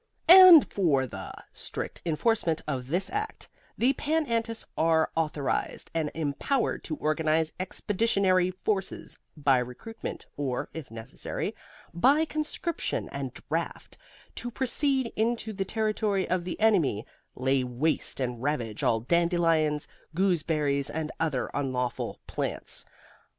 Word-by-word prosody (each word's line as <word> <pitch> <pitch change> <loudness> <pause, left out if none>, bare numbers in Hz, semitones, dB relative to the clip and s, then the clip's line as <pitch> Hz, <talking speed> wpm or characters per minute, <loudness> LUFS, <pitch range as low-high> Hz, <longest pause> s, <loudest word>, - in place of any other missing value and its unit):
AND 360 -3 +10
FOR 150 -9 +2
THE 125 - -7 0.2
strict - - -6
enforcement 165 0 +1
of 130 -4 -3
this 180 +7 0
Act, 430 +2 -4 0.3
the 255 +3 +3
Pan 310 +2 0
Antis 230 -2 -2
are 160 0 +2
authorized 155 -4 -1
and 160 -2 0
empowered 165 - -1
to 155 - -3
organize 155 +1 +1
expeditionary 190 -1 +1
forces, 190 +1 -3 0.2
by 140 -3 +4
recruitment 125 - -6
or 130 -4 -2
(if 160 -4 -7
necessary) 115 0 -5 0.4
by 275 - +4
conscription 310 +2 -3
and - - -4 0.2
draft, - - -3 0.4
to 240 - -4
proceed 265 +1 0
into 225 0 0
the 195 -1 -2
territory 215 -2 0
of 180 -1 0
the 180 - -5
enemy, 175 - +3 0.3
lay 130 +1 +1
waste 125 +7 -1
and 125 -3 -2
ravage 120 -7 -2
all 115 -1 +2
dandelions, 165 0 +2 0.3
gooseberries 155 -6 +1
and 160 0 -3
other 150 -6 -1
unlawful 130 -3 -2
plants. - - -4
165 Hz, 120 wpm, -28 LUFS, 145-220 Hz, 0.4 s, AND